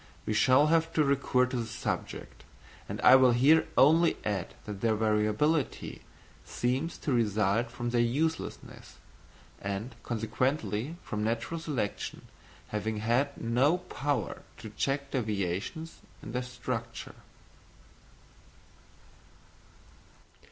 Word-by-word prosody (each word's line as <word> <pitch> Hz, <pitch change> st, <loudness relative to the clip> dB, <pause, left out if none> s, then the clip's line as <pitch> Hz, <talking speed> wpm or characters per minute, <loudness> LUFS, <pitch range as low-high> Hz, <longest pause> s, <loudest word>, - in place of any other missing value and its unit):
We 110 Hz, -, -1 dB
shall 130 Hz, +6 st, +5 dB
have 165 Hz, 0 st, +2 dB
to 155 Hz, -, +3 dB
recur 140 Hz, -2 st, +2 dB
to 125 Hz, 0 st, -3 dB
this 115 Hz, -2 st, -3 dB
subject; -, -, -5 dB, 0.5 s
and -, -, -4 dB
I 130 Hz, -, +8 dB
will 130 Hz, -2 st, +6 dB
here 145 Hz, +7 st, +5 dB
only 160 Hz, +4 st, +5 dB
add 100 Hz, -3 st, -2 dB
that 105 Hz, -2 st, -6 dB
their 115 Hz, -1 st, +2 dB
variability 110 Hz, +8 st, 0 dB, 0.4 s
seems 130 Hz, +7 st, -2 dB
to 145 Hz, -, -2 dB
result 110 Hz, 0 st, +1 dB
from 120 Hz, 0 st, -4 dB
their 120 Hz, -1 st, +3 dB
uselessness, 150 Hz, +8 st, -2 dB, 0.7 s
and 100 Hz, +5 st, -4 dB
consequently 115 Hz, -, -1 dB
from 105 Hz, 0 st, -3 dB
natural 115 Hz, +9 st, -2 dB
selection 140 Hz, -10 st, -3 dB, 0.5 s
having 105 Hz, +1 st, -2 dB
had 120 Hz, +6 st, 0 dB
no 125 Hz, +9 st, +2 dB
power 145 Hz, -5 st, -3 dB, 0.2 s
to 110 Hz, -2 st, -9 dB
check 140 Hz, +4 st, -2 dB
deviations 110 Hz, -, -3 dB, 0.2 s
in -, -, -7 dB
their 125 Hz, +2 st, -1 dB
structure. 125 Hz, -2 st, -5 dB
120 Hz, 110 wpm, -30 LUFS, 110-140 Hz, 0.7 s, I